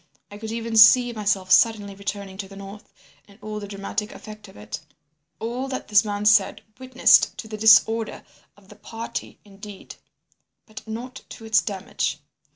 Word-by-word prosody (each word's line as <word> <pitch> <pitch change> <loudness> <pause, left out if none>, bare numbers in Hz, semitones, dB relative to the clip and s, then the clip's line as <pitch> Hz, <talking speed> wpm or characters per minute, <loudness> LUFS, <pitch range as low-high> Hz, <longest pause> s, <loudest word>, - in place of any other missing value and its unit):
I 205 - -10
could 220 0 -6
even 230 0 -3
see 240 +3 +7
myself 200 -4 -1
suddenly 215 -4 +3
returning 200 -1 -6
to 195 - -5
the 195 - -14
north, 200 +1 -11 0.4
and 200 -1 -19
all 215 0 -6
the 205 - -8
dramatic 205 +1 -5
effect 215 -1 -12
of 190 - -16
it. 105 +1 -7 0.6
All 240 +4 -4
that 260 -1 -6
this 205 -1 +5
man 205 -1 -4
said 210 -2 +3 0.2
witnessed 260 0 +3
to 220 - -8
the 215 - -7
disorder 220 +1 +4 0.3
of 195 -1 -22
the 210 - -15
party 225 +2 -7
indeed, 200 0 -12 0.7
but 215 -1 -11
not 235 +3 -7
to 225 - -11
its 220 -1 +3
damage. 195 -3 -3
210 Hz, 165 wpm, -23 LUFS, 200-225 Hz, 0.7 s, see